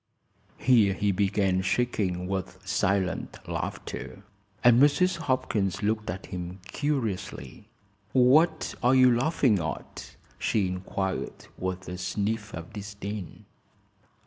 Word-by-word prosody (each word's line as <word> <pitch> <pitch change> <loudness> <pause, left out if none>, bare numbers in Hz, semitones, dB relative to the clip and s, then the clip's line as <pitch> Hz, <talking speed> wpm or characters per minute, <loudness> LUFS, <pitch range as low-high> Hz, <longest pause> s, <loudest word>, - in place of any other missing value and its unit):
Here 110 -6 +4
he 105 0 +1
began 95 -1 +1
shaking 95 -3 0
with 95 -1 -4
silent 95 -1 0
laughter, - - -5 0.4
and 120 +1 +7
Mrs. 170 +5 +4
Hopkins 110 - -1
looked 105 0 0
at 95 +3 -5
him 90 0 -6
curiously. 115 -6 -3 0.4
"What 135 +7 +4
are 125 +1 +4
you 130 -2 +6
laughing 125 - +2
at?" 80 -1 -6 0.2
she 105 -3 +1
inquired, 95 +1 -3
with 95 0 -4
a 90 0 -5
sniff 105 +3 -2
of 80 +3 -8
disdain. 100 -2 -7
100 Hz, 110 wpm, -27 LUFS, 95-125 Hz, 0.4 s, and